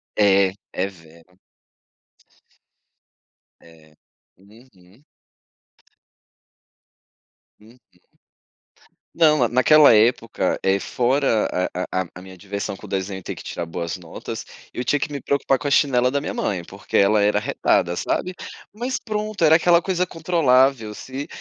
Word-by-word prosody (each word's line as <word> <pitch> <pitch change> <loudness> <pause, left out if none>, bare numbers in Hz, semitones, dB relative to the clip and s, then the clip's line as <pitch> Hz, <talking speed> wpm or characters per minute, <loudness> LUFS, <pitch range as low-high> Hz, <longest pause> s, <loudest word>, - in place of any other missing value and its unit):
É, 100 -2 +4 0.2
é 95 - -1
vero. 85 0 -18 2.2
É, 80 -2 -20 0.4
uhum. 105 +1 -22 2.6
Uhum. 110 +4 -19 1.4
Não, 155 -2 +4
na 120 - +3
naquela 135 +4 +6
época, 115 +1 +1
é, 95 +1 +1
fora 125 0 +1 0.3
a 90 - -3
a 95 - +2
a - - -14
a 90 - -10
minha 95 0 -13
diversão 100 +1 -5
com 105 - -12
desenho, 95 0 -3
e - - -16
ter - - -5
que - - -11
tirar 85 - -5
boas 85 +1 -5
notas, 85 -3 -8 0.3
eu 125 - -4
tinha 145 +3 +1
que 150 - -3
me 140 - -4
preocupar 140 -1 0
com 130 +3 -5
a - - -1
chinela 125 -3 +3
da 140 +1 -1
minha - - -4
mãe, 90 -4 -2
porque - - -9
ela 100 +2 +4
era 105 0 +2
arretada, 90 -4 0
sabe. 185 - -2 0.4
Mas 245 +5 -4
pronto, 215 -3 -4
era 160 0 +6
aquela 170 +1 +4
coisa 180 -1 -1
controlável, 135 -9 +2
se 135 +6 -7
115 Hz, 135 wpm, -22 LUFS, 95-145 Hz, 2.6 s, naquela